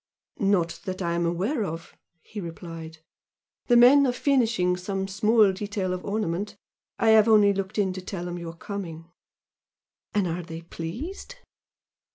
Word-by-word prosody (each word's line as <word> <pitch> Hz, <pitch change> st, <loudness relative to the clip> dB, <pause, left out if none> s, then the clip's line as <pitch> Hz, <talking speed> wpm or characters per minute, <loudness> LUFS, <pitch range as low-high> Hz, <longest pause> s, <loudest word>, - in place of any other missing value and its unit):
"Not 190 Hz, -4 st, +1 dB
that 185 Hz, -1 st, -4 dB
I 170 Hz, 0 st, 0 dB
am 170 Hz, 0 st, 0 dB
aware 205 Hz, -, -1 dB
of" 165 Hz, -2 st, -6 dB, 0.3 s
he 210 Hz, -, -7 dB
replied 165 Hz, -2 st, -8 dB, 0.6 s
"The 240 Hz, -, +5 dB
men 270 Hz, +4 st, +7 dB
are -, -, +2 dB
finishing 235 Hz, -9 st, +2 dB
some 190 Hz, +1 st, -3 dB
small 210 Hz, +1 st, +4 dB
detail 195 Hz, -1 st, -3 dB
of 185 Hz, -, -5 dB
ornament. 205 Hz, 0 st, -2 dB, 0.4 s
I 225 Hz, -, +3 dB
have 220 Hz, 0 st, +6 dB
only 210 Hz, -2 st, +6 dB
looked 195 Hz, +1 st, -4 dB
in 195 Hz, -3 st, +1 dB
to 185 Hz, -, -6 dB
tell 180 Hz, -1 st, -5 dB
them 175 Hz, 0 st, -5 dB
you 170 Hz, -1 st, -6 dB
are 165 Hz, -, -9 dB
coming." 170 Hz, -4 st, -7 dB, 1.0 s
"And 205 Hz, -2 st, +2 dB
are 170 Hz, +1 st, -2 dB
they 165 Hz, -1 st, -8 dB
pleased?" 245 Hz, -, -7 dB
190 Hz, 160 wpm, -26 LUFS, 170-215 Hz, 1.0 s, men